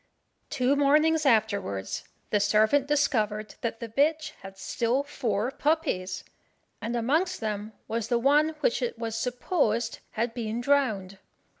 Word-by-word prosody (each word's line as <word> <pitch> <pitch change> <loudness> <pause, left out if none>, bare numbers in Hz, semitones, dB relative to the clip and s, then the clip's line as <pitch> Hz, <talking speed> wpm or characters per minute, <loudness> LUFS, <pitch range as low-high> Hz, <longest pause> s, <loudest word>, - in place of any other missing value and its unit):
Two 255 +2 +2
mornings 305 +2 +3
afterwards, 200 - 0 0.3
the 210 - +3
servant 215 +7 +3
discovered 215 -8 +1
that 230 -1 -3
the 230 - -5
bitch 305 +6 +1
had 195 0 -10
still 235 +7 0
four 230 -4 -1
puppies, 270 - -1 0.6
and 235 +2 -3
amongst 315 +11 +1
them 215 -1 -4
was 230 0 -2
the 240 - +2
one 295 +5 +3
which 260 - +1
it 240 -1 -2
was 225 -1 -4
supposed 240 -1 0
had 225 +1 -1
been 230 -1 -3
drowned. 220 -8 +1
235 Hz, 135 wpm, -27 LUFS, 215-285 Hz, 0.6 s, mornings